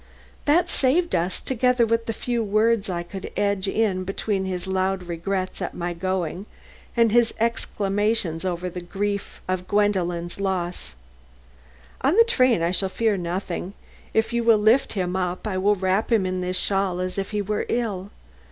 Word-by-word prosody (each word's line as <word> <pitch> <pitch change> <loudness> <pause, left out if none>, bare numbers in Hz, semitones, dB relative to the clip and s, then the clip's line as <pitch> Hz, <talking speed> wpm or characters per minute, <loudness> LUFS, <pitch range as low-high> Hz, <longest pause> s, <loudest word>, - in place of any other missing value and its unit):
"That 330 +4 +4
saved 335 +3 +1
us, 175 +2 0
together 250 -1 +2
with 230 0 0
the - - 0
few 235 +1 -2
words 215 0 +2
I 175 -1 -2
could 190 +2 -7
edge 200 -1 +1
in 195 -3 +1
between 195 +1 -2
his 185 -1 -3
loud 190 0 0
regrets 185 +3 -3
at 180 - -3
my 175 0 -3
going 185 +1 -2 0.5
and 230 -2 +5
his 235 0 +3
exclamations 205 -5 0
of 180 -2 -2 0.3
grief 200 +1 -3
over 185 -1 0
Gwendolen's 180 -3 0
loss. 180 - -2 1.1
On 285 +9 +2
the 460 - +9
train 255 - +3
I 170 - +2
shall 190 +1 +1
fear 220 +1 +1
nothing. 180 +1 -4 0.4
If 220 +1 +1
you 235 0 +1
will 230 -1 +6
lift 220 +6 +3
him 185 -3 -1
up 180 +1 -2
I 190 -3 -1
will 205 +2 +3
wrap 190 +4 0
him 215 -5 +3
in 185 0 -2
this 180 0 -1
shawl 195 -1 +1
as 185 +1 -2
if 195 - -3
he 210 -1 -1
were 210 +1 -2
ill. 205 -5 -1
195 Hz, 170 wpm, -24 LUFS, 185-225 Hz, 1.1 s, the